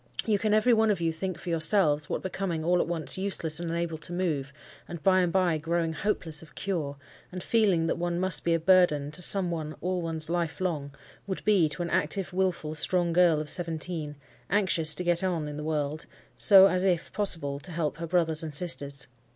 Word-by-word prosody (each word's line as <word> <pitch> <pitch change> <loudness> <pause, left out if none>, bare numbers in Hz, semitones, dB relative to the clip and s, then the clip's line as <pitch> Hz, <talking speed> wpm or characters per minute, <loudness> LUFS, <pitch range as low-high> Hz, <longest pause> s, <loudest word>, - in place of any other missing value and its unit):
You 210 -3 +1
can 215 0 -1
every 215 +3 +3
one 220 -1 +3
of 200 -4 0
you 165 -1 0
think 180 +2 -5
for 175 - -8
yourselves 165 -3 +3
what - - -3
becoming 180 -3 -3
all 180 +1 +2
at - - -3
once 170 +1 -3
useless 170 -5 -1
and 170 -1 -4
unable 165 -1 -3
to 170 - -7
move, 160 -7 -2 0.4
and 170 -3 -9
by 185 -1 +4
and 175 -1 0
by 175 -3 +1
growing 165 +1 -2
hopeless 160 -2 -1
of 160 -4 -16
cure, 155 -8 -4 0.3
and 185 0 -7
feeling 200 -8 +2
that 165 - -2
one 175 0 -2
must 185 -4 +3
be 170 -1 +1
a - - -1
burden 165 -5 +3
to 180 - -2
some 180 0 +4
one 155 -2 -5
all 180 +1 -2
one's 160 -2 -4
life 170 -1 -2
long, 160 -7 -3 0.4
would 190 - -5
be 195 -7 +3
to 175 - -3
an 170 - -5
active, 185 +1 -1
wilful, 180 -5 -1
strong 175 +1 +1
girl 170 -3 +4
of 155 - -5
seventeen, 160 -2 -3 0.3
anxious 175 -6 +2
to 180 - -4
get 175 0 +1
on 170 -5 -2
in 150 0 -7
the 150 - -6
world, 155 0 -3 0.3
so 195 -2 +8
as, 185 -1 +1
if 180 -3 -1
possible, 165 -9 -1
to 175 - -11
help 160 -2 -3
her 170 0 -5
brothers 165 -2 +1
and 155 -3 -6
sisters. 140 -5 +1
170 Hz, 215 wpm, -27 LUFS, 155-185 Hz, 0.4 s, so